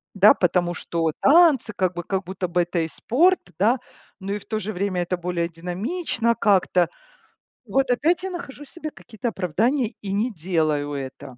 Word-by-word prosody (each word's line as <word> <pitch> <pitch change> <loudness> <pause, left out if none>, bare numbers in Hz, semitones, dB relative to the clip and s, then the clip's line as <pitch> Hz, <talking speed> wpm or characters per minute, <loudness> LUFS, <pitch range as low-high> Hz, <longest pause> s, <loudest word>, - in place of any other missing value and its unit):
Да, 200 +2 +7
потому 175 -1 +1
что 165 -1 -1
танцы 295 -7 +5
как 185 -2 0
бы, 175 - -4
как 190 +2 -2
будто 185 0 -4
бы 175 +1 +2
это 175 0 -2
и 160 - -1
спорт, 335 - +2 0.2
да, 230 +7 +3 0.4
но 195 +1 -4
и 205 - -1
в 205 - -15
то 220 - -2
же 215 0 -4
время 185 -2 -1
это 180 +1 -1
более 175 -1 -2
динамично 225 - -2
как-то. 185 -4 +3 0.8
Вот 270 -1 +1
опять 320 +9 +2
я 380 - -2
нахожу 345 -6 -7
себе 310 0 -7
какие-то 235 -1 -5
оправдания 225 - 0
и 200 - -5
не 215 +5 0
делаю 155 -5 -1
это. 130 -2 -7
195 Hz, 180 wpm, -23 LUFS, 175-245 Hz, 0.8 s, Да